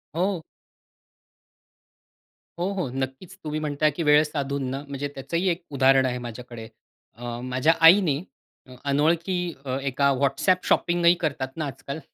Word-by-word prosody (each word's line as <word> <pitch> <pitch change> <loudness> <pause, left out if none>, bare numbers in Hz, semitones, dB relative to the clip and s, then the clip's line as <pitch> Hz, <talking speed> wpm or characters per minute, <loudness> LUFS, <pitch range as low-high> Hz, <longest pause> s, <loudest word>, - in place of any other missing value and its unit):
हो. 185 0 0 2.2
हो, 180 +3 -1
हो, 180 -9 -2
नक्कीच. 135 +9 -5
तुम्ही 155 0 -3
म्हणताय, 150 0 +1
की 165 +4 -4
वेळ 150 0 +6
साधून 140 -2 -3
ना. 135 +2 -4
म्हणजे 140 0 -4
त्याचंही 170 +7 -2
1 175 +1 -2
उदाहरण 135 -1 +4
आहे 125 -1 -1
माझ्याकडे. 120 -1 -9 0.5
अ, 120 0 -6
माझ्या 130 +5 +2
आईने 165 -5 +6 0.6
अनोळखी 160 +6 +1 0.5
एका 140 +1 +1
WhatsApp 175 +7 +1
शॉपिंग 175 0 +2
ही 170 - +8
करतात 135 -4 -3
ना 155 - -2
आजकाल. 140 +2 -6
145 Hz, 135 wpm, -25 LUFS, 135-170 Hz, 2.2 s, ही